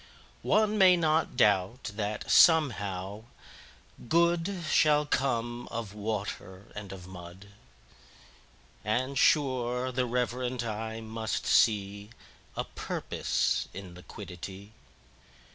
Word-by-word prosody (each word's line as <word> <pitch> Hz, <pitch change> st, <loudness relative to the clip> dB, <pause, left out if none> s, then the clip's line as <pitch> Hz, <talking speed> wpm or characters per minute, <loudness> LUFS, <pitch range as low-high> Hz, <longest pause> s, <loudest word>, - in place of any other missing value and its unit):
9One 215 Hz, 0 st, +2 dB
may 185 Hz, -3 st, +7 dB
not 160 Hz, -1 st, +1 dB
doubt 100 Hz, +4 st, +2 dB
that, 105 Hz, 0 st, -3 dB
somehow, 105 Hz, -, +3 dB, 0.8 s
Good10Shall 165 Hz, -1 st, +2 dB
come 120 Hz, -3 st, -1 dB
of 115 Hz, -3 st, -5 dB
Water 100 Hz, -3 st, -5 dB
and 100 Hz, -2 st, -8 dB
of 95 Hz, -2 st, -9 dB
Mud;11And, 95 Hz, -, -8 dB
sure, 130 Hz, -3 st, +2 dB
the 125 Hz, 0 st, -1 dB
reverent 125 Hz, 0 st, -1 dB
eye 110 Hz, 0 st, -4 dB
must 110 Hz, 0 st, -3 dB
see12A 100 Hz, -1 st, +2 dB, 0.6 s
Purpose -, -, -1 dB
in 95 Hz, -2 st, -8 dB
Liquidity. 95 Hz, +2 st, -9 dB
110 Hz, 85 wpm, -29 LUFS, 100-130 Hz, 0.8 s, may